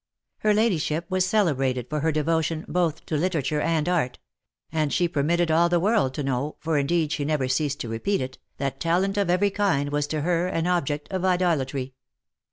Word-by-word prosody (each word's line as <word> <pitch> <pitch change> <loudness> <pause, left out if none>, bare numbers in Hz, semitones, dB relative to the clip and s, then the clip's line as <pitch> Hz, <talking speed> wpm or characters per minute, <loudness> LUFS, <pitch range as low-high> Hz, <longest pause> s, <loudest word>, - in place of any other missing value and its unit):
Her 215 - +2
ladyship 175 -7 +1
was 185 0 +2
celebrated 135 - +1
for 150 - -2
her 160 +2 +1
devotion 160 +1 0
both 170 -3 -1
to 155 - -2
literature 155 -3 0
and 165 -1 0
art; 165 -9 0 0.5
and 155 -3 0
she 175 - +2
permitted 165 +2 +1
all 170 +2 +4
the 175 0 +3
world 195 - +1
to 145 - -2
know, 135 +2 -2
for 160 -2 0
indeed 155 +2 +1
she 150 - -1
never 145 -3 0
ceased 145 +2 0
to - - -4
repeat 115 - -1
it, 130 0 -5 0.2
that 135 -1 -3
talent 180 +4 +1
of 200 -3 0
every 190 +3 +3
kind 185 -9 0
was 145 0 0
to 155 0 -2
her 175 +2 +1
an 165 -3 -1
object 150 -5 0
of 185 -1 -2
idolatry. 145 -8 0
160 Hz, 190 wpm, -25 LUFS, 145-180 Hz, 0.5 s, all